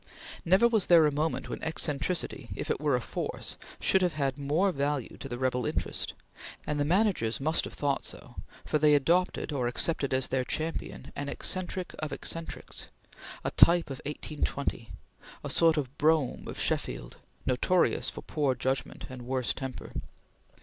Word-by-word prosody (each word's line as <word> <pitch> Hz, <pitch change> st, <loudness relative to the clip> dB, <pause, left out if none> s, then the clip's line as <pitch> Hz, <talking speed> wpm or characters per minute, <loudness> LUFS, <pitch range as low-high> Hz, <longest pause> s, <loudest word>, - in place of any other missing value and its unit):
Never 190 Hz, +7 st, +5 dB
was 220 Hz, -5 st, +2 dB
there 170 Hz, -3 st, +8 dB
a 150 Hz, -, +2 dB
moment 155 Hz, +3 st, -1 dB
when -, -, -5 dB
eccentricity, 150 Hz, -4 st, -1 dB
if -, -, -2 dB
it -, -, -1 dB
were 145 Hz, -3 st, +3 dB
a -, -, +2 dB
force, -, -, -4 dB, 0.2 s
should 190 Hz, -, +3 dB
have 180 Hz, -2 st, +2 dB
had 135 Hz, -3 st, 0 dB
more 150 Hz, +8 st, +2 dB
value 140 Hz, -4 st, -1 dB
to -, -, -7 dB
the 120 Hz, -, -3 dB
rebel 125 Hz, -1 st, 0 dB
interest; -, -, -2 dB, 0.5 s
and 150 Hz, -1 st, -1 dB
the 145 Hz, -, +2 dB
managers 180 Hz, -, +2 dB
must 155 Hz, +4 st, +2 dB
have -, -, -8 dB
thought 140 Hz, -2 st, 0 dB
so, -, -, -7 dB, 0.3 s
for 150 Hz, -, +1 dB
they 150 Hz, 0 st, +6 dB
adopted 170 Hz, +4 st, +2 dB
or 130 Hz, -4 st, 0 dB
accepted 140 Hz, +3 st, 0 dB
as 130 Hz, 0 st, +1 dB
their 130 Hz, -1 st, +1 dB
champion 160 Hz, +5 st, -3 dB
an 145 Hz, 0 st, -3 dB
eccentric 185 Hz, +2 st, -2 dB
of 155 Hz, -1 st, -3 dB
eccentrics; 165 Hz, 0 st, -5 dB, 0.6 s
a -, -, -1 dB
type 170 Hz, -3 st, +6 dB
of 135 Hz, -, -6 dB
1820; 145 Hz, -5 st, -3 dB, 0.5 s
a -, -, -3 dB
sort 165 Hz, -1 st, +5 dB
of 135 Hz, -2 st, -2 dB
Brougham 155 Hz, -3 st, +2 dB
of -, -, -6 dB
Sheffield, -, -, -2 dB, 0.3 s
notorious 170 Hz, +8 st, +2 dB
for -, -, -8 dB
poor 145 Hz, -4 st, 0 dB
judgment 130 Hz, 0 st, -2 dB
and 130 Hz, -1 st, -8 dB
worse 130 Hz, -1 st, 0 dB
temper. 130 Hz, -2 st, -6 dB
150 Hz, 165 wpm, -30 LUFS, 130-165 Hz, 0.6 s, there